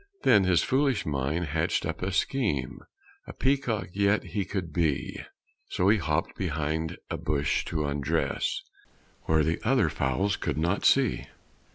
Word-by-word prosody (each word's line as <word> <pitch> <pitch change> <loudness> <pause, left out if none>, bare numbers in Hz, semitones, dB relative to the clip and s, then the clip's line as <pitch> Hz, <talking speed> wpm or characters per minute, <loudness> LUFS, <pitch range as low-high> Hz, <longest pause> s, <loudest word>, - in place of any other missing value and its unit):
Then 100 -2 +5
his 90 -2 +3
foolish 135 -3 +1
mind 75 +4 -1
hatched 80 +2 0
up - - -4
a 95 +2 -1
scheme 95 - -1 0.5
A - - -8
peacock 125 -9 0
yet 100 +1 +2
he 100 -3 -3
could 90 -4 -4
be; 80 -5 0 0.5
So 90 +2 +2
he 105 0 +4
hopped 80 0 -1
behind 80 -2 -2
a - - -1
bush 75 -1 0
to 75 -3 -2
undress 70 -1 -1 0.6
Where 80 -1 +3
the 80 +2 0
other - - +3
fowls 95 +10 0
could - - -2
not 85 +5 0
see. 135 -6 +3
85 Hz, 150 wpm, -27 LUFS, 75-100 Hz, 0.6 s, Then